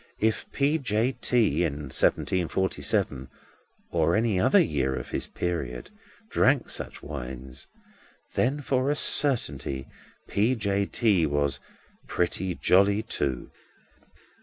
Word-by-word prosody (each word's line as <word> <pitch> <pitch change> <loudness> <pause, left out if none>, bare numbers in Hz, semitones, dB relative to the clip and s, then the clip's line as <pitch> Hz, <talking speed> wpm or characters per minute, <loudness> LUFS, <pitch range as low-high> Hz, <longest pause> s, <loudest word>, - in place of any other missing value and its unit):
If 110 0 -1
P. 145 +3 +1
J. 115 -1 0
T. 120 -8 +1
in 75 -4 -3
seventeen 90 +5 +1
forty 95 +3 -2
seven, 95 - -1 0.6
or - - +2
in 110 +2 +2
any 105 -5 +1
other - - +4
year 65 -3 0
of - - -7
his - - -2
period, 70 -9 -4 0.4
drank - - +2
such - - -4
wines—then, 65 - -6
for 130 0 0
a 145 - +1
certainty, 120 - +3 0.4
P. 110 +6 +1
J. 100 -3 -1
T. 100 -9 +2
was 70 -1 0 0.5
Pretty 90 +1 -1
Jolly 100 +5 +3
Too. 70 - -3
95 Hz, 120 wpm, -26 LUFS, 70-115 Hz, 0.6 s, other